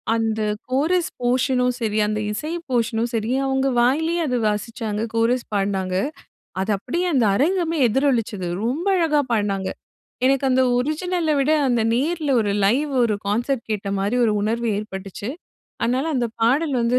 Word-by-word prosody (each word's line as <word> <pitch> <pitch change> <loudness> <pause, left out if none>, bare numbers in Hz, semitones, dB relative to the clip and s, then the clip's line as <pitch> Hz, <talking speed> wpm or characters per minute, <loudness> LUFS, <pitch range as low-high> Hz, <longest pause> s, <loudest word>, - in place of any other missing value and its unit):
அந்த 220 -1 0 0.3
chorus 320 +7 +1
portion 250 +1 +2
ம் 250 - -2
சரி, 215 -2 -1
அந்த 215 0 -1
இசை 300 +10 -4 0.2
போர்ஷனும் 230 -1 0
சரி, 225 +1 -1
அவுங்க 265 0 +1
வாயிலயே 320 +8 +2
அது 250 -1 0
வாசிச்சாங்க, 210 0 -2
கோரஸ் 235 +2 +1
பாடுனாங்க. 195 -2 -1 0.7
அது 200 +3 -1
அப்டியே 345 - -2
அந்த 250 -4 +3
அரங்கமே 335 - +1
எதிரொலிச்சது. 230 -7 0 0.2
ரொம்ப 295 +10 -1
அழகா 305 -4 +3
பாடுனாங்க. 200 -3 0 0.6
எனக்கு 275 0 +2
அந்த 260 0 +4 0.2
ஒரிஜினல 320 +4 -1
விட, 275 - +1 0.2
அந்த 240 -2 +2
நேர்ல 305 +3 0
ஒரு 205 - 0
லைவ் 275 +9 +2
ஒரு 215 - +1
கான்செர்ட் 240 +4 0
கேட்ட 205 -2 -2
மாரி 205 +5 0
ஒரு 215 - +2
உணர்வு 230 +2 -1
ஏற்பட்டுச்சு. 200 +1 -6 0.5
அதனால 255 +6 +1
அந்த 240 -1 +1
பாடல் 275 +5 +2
வந்து 235 +2 +2
245 Hz, 150 wpm, -22 LUFS, 215-280 Hz, 0.7 s, அந்த